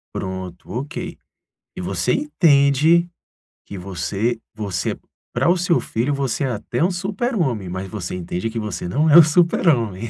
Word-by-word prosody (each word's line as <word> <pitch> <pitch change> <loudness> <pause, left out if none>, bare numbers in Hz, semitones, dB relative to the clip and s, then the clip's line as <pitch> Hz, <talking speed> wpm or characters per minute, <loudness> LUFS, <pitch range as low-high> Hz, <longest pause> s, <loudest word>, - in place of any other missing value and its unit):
Pronto, 95 -2 -6
ok. 135 +8 -5 0.6
E - - -5
você - - -1
entende 160 - +3 0.6
que 100 - -8
você 100 +5 -2
você 100 -5 -3 0.4
para - - +2
o 180 - +5
seu 175 -1 +2
filho, 125 +6 -1
você 140 0 -1
é - - +1
até 120 +6 -2
um 180 - +2
Super-homem, 185 - -2
mas 95 +2 -4
você 90 -4 -5
entende 90 +4 -3
que 115 - -4
você 105 -6 -4
não 150 - +2
é 155 - +8
um 170 - +11
Super-homem, 145 - +2
120 Hz, 155 wpm, -21 LUFS, -, 0.6 s, um